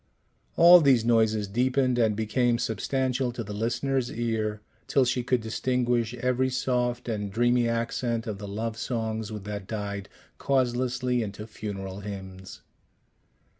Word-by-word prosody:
All 175 Hz, +1 st, +9 dB
these 130 Hz, -6 st, +4 dB
noises 110 Hz, -3 st, +2 dB
deepened 125 Hz, +3 st, +1 dB
and 110 Hz, -3 st, +3 dB
became 115 Hz, +3 st, +1 dB
substantial 130 Hz, +3 st, -1 dB
to 120 Hz, -, -4 dB
the 105 Hz, -1 st, -7 dB
listener's 120 Hz, +4 st, -1 dB
ear, 110 Hz, -2 st, -2 dB, 0.3 s
till 135 Hz, -, +3 dB
she 125 Hz, +1 st, 0 dB
could 125 Hz, 0 st, +1 dB
distinguish 120 Hz, +1 st, 0 dB
every 125 Hz, +1 st, 0 dB
soft 125 Hz, -1 st, -1 dB
and 105 Hz, -3 st, -3 dB
dreamy 120 Hz, +2 st, +2 dB
accent 115 Hz, 0 st, -1 dB
of 105 Hz, -4 st, -5 dB
the 105 Hz, -, -6 dB
love 110 Hz, +3 st, -4 dB
songs 110 Hz, -2 st, -3 dB
that 105 Hz, -2 st, -6 dB
died 100 Hz, -2 st, -4 dB, 0.3 s
causelessly 125 Hz, -1 st, 0 dB
into 105 Hz, 0 st, -5 dB
funeral 100 Hz, -3 st, -6 dB
hymns. 95 Hz, -2 st, -8 dB
115 Hz, 130 wpm, -27 LUFS, 105-125 Hz, 0.3 s, All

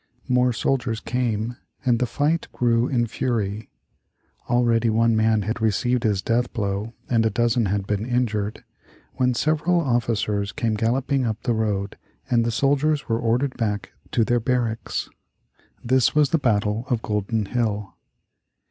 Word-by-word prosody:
More 125 Hz, 0 st, +3 dB
soldiers 120 Hz, -1 st, -1 dB
came 120 Hz, -1 st, -2 dB, 0.3 s
and 120 Hz, -2 st, +3 dB
the 125 Hz, -, +1 dB
fight 150 Hz, +8 st, 0 dB
grew 120 Hz, 0 st, +2 dB
in 120 Hz, -3 st, +1 dB
fury. 110 Hz, -2 st, -2 dB, 0.8 s
Already 120 Hz, -1 st, +3 dB
one 115 Hz, +1 st, +3 dB
man 110 Hz, -1 st, +2 dB
had 110 Hz, +3 st, -3 dB
received 120 Hz, +3 st, +1 dB
his 100 Hz, -3 st, +1 dB
death 120 Hz, +1 st, 0 dB
blow 105 Hz, +1 st, -3 dB
and 115 Hz, -2 st, +2 dB
a 110 Hz, -, +3 dB
dozen 115 Hz, +1 st, +1 dB
had 100 Hz, 0 st, -1 dB
been 105 Hz, +2 st, -2 dB
injured, 110 Hz, -4 st, -1 dB, 0.5 s
when 125 Hz, -1 st, +2 dB
several 155 Hz, +5 st, +2 dB
officers 115 Hz, -, 0 dB
came 115 Hz, -2 st, -1 dB
galloping 125 Hz, +5 st, 0 dB
up 110 Hz, 0 st, -3 dB
the 120 Hz, -, +1 dB
road 105 Hz, -3 st, -1 dB, 0.3 s
and 120 Hz, -1 st, +4 dB
the 115 Hz, -, 0 dB
soldiers 145 Hz, +4 st, +1 dB
were 115 Hz, -2 st, 0 dB
ordered 125 Hz, +4 st, 0 dB
back 105 Hz, -3 st, -2 dB, 0.2 s
to 115 Hz, -, +3 dB
their 120 Hz, 0 st, +2 dB
barracks. 120 Hz, -1 st, -1 dB, 0.8 s
This 130 Hz, +3 st, +2 dB
was 150 Hz, -2 st, +4 dB
the 165 Hz, -, +3 dB
battle 110 Hz, -3 st, +1 dB
of 120 Hz, -4 st, 0 dB
Golden 105 Hz, +1 st, -1 dB
Hill. 105 Hz, -3 st, -2 dB
115 Hz, 150 wpm, -23 LUFS, 110-125 Hz, 0.8 s, and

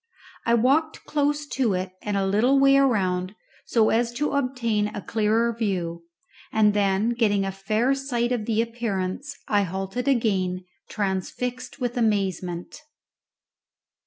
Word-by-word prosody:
I 235 Hz, -, +5 dB
walked 280 Hz, +7 st, +2 dB
close 295 Hz, 0 st, 0 dB
to 240 Hz, -8 st, +1 dB
it 185 Hz, +1 st, -3 dB
and 205 Hz, -1 st, -2 dB
a 195 Hz, -, +1 dB
little 220 Hz, +8 st, +3 dB
way 275 Hz, 0 st, +6 dB
around 195 Hz, -8 st, +1 dB, 0.3 s
so 225 Hz, -2 st, +3 dB
as 235 Hz, +1 st, +1 dB
to 295 Hz, +5 st, -1 dB
obtain 250 Hz, -6 st, 0 dB
a 210 Hz, -, -6 dB
clearer 225 Hz, +2 st, +1 dB
view, 175 Hz, -7 st, -2 dB, 0.5 s
and 210 Hz, -1 st, +4 dB
then 200 Hz, +1 st, +2 dB
getting 210 Hz, -4 st, +1 dB
a 195 Hz, -, -2 dB
fair 215 Hz, +7 st, 0 dB
sight 250 Hz, -3 st, -1 dB
of 235 Hz, -4 st, -1 dB
the 225 Hz, 0 st, +2 dB
appearance 230 Hz, +3 st, -4 dB
I 205 Hz, -1 st, +3 dB
halted 195 Hz, +7 st, -3 dB
again, 190 Hz, -8 st, +1 dB, 0.2 s
transfixed 215 Hz, +7 st, -3 dB
with 245 Hz, -1 st, -2 dB
amazement. 190 Hz, -6 st, -1 dB
220 Hz, 135 wpm, -25 LUFS, 195-250 Hz, 0.5 s, way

